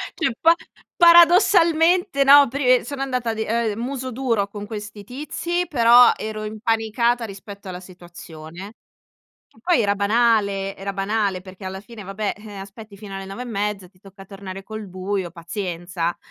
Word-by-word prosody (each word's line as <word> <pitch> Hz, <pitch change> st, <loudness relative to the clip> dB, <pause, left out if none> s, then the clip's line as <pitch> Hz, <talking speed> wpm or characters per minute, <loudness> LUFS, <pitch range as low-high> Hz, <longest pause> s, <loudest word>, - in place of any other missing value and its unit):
Cioè, 320 Hz, -6 st, 0 dB
pa 330 Hz, +1 st, +5 dB, 0.4 s
paradossalmente, 340 Hz, -2 st, +5 dB
no, 280 Hz, +1 st, +7 dB
pre 255 Hz, -1 st, +2 dB
sono 275 Hz, +2 st, -6 dB
andata 250 Hz, -4 st, -2 dB
di, 220 Hz, 0 st, -3 dB
ehm, 225 Hz, -2 st, -1 dB
muso 260 Hz, +1 st, -4 dB
duro 230 Hz, -6 st, 0 dB
con 205 Hz, 0 st, -8 dB
questi 205 Hz, -1 st, -8 dB
tizi, 305 Hz, -, -3 dB
però 240 Hz, -3 st, +6 dB
ero 215 Hz, 0 st, -6 dB
impanicata 225 Hz, +2 st, 0 dB
rispetto 200 Hz, -1 st, -11 dB
alla 180 Hz, -1 st, -6 dB
situazione. 175 Hz, +1 st, -12 dB, 0.7 s
Che -, -, -27 dB
poi 350 Hz, -3 st, +2 dB
era 200 Hz, -1 st, +1 dB
banale, 200 Hz, -2 st, +1 dB
era 195 Hz, +1 st, -5 dB
banale 200 Hz, -1 st, -1 dB
perché 185 Hz, 0 st, -12 dB
alla 190 Hz, 0 st, -6 dB
fine 215 Hz, +1 st, -12 dB
vabbè, 195 Hz, +2 st, -3 dB
eh, 210 Hz, -1 st, -11 dB
aspetti 200 Hz, +2 st, -11 dB
fino 200 Hz, -1 st, -10 dB
alle 195 Hz, 0 st, -6 dB
9 195 Hz, +6 st, -7 dB
e -, -, -6 dB
mezza, 205 Hz, -4 st, -3 dB
ti 185 Hz, 0 st, -30 dB
tocca 195 Hz, 0 st, -14 dB
tornare 195 Hz, -1 st, -9 dB
col 215 Hz, 0 st, -7 dB
buio, 185 Hz, 0 st, -4 dB
pazienza. 175 Hz, 0 st, -4 dB
210 Hz, 160 wpm, -22 LUFS, 195-245 Hz, 0.7 s, no